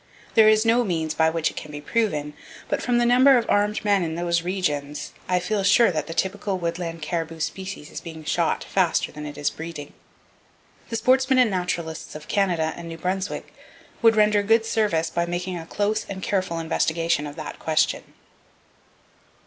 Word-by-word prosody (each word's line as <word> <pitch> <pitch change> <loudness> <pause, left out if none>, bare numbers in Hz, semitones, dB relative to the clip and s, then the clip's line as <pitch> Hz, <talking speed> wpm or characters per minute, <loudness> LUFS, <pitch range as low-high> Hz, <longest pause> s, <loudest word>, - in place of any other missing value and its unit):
There 220 -1 +7
is 215 +1 +4
no 235 +2 +4
means 160 -6 -1
by 160 0 +3
which 160 -1 0
it - - -18
can 150 - -7
be 145 - -6
proven, 150 -4 -1 0.4
but - - 0
from 245 0 +1
the 240 - +3
number 255 +2 +6
of 235 - -1
armed 210 +1 +1
men 200 -2 +3
in 160 -2 -2
those 170 0 0
regions 150 -6 -3 0.2
I 180 - +3
feel 200 +3 -1
sure 210 +2 +5
that 155 -3 -3
the 165 - -5
typical 195 0 -1
woodland 170 -2 -4
caribou 165 0 -3
species 190 -1 -5
is - - -6
being 160 -1 -9
shot - - 0
faster - - +1
than 150 0 -7
it 145 - -8
is 145 - 0
breeding. 160 -3 -8 1.0
The 230 - -3
sportsmen 260 +3 +3
and 250 -4 +4
naturalists 170 -4 -3
of 155 0 -9
Canada 175 -6 +1
and 170 -1 -8
New 165 - -7
Brunswick 185 +3 -3 0.5
would 225 -1 +5
render 210 -1 +4
good 225 +2 +3
service 205 -8 0
by 170 0 -1
making 180 +1 -3
a 165 - -9
close 205 +3 0
and 190 -1 -6
careful 185 -4 -1
investigation 165 -1 0
of 145 - -9
that 155 -2 -7
question. 160 -1 0
180 Hz, 185 wpm, -24 LUFS, 160-210 Hz, 1.0 s, There